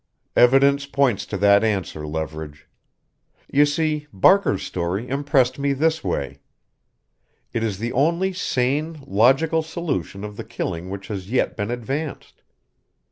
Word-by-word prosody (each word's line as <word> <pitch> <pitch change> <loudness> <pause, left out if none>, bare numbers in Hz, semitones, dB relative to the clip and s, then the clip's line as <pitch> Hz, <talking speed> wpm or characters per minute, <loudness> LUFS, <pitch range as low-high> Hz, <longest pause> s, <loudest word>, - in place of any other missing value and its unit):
"Evidence 140 +3 +5
points 140 -7 +1
to 100 - -3
that 100 +1 +5
answer, 95 -8 -2
Leverage. 75 -1 -6 0.8
You 145 +1 +4
see, 150 0 -1
Barker's 130 - +3
story 90 +6 -3
impressed 135 -2 +1
me 140 0 +1
this 160 +3 0
way: 70 - -3 1.1
it 115 - -1
is 105 -4 -2
the 115 +4 -3
only 170 +8 +1
sane, 150 0 -1
logical 135 +8 +3
solution 155 - -4
of 105 0 -7
the - - -5
killing 90 -6 -5
which 95 0 -7
has 95 -2 -5
yet 125 - 0
been 100 -1 -3
advanced. 135 +6 -5
125 Hz, 135 wpm, -22 LUFS, 100-145 Hz, 1.1 s, Evidence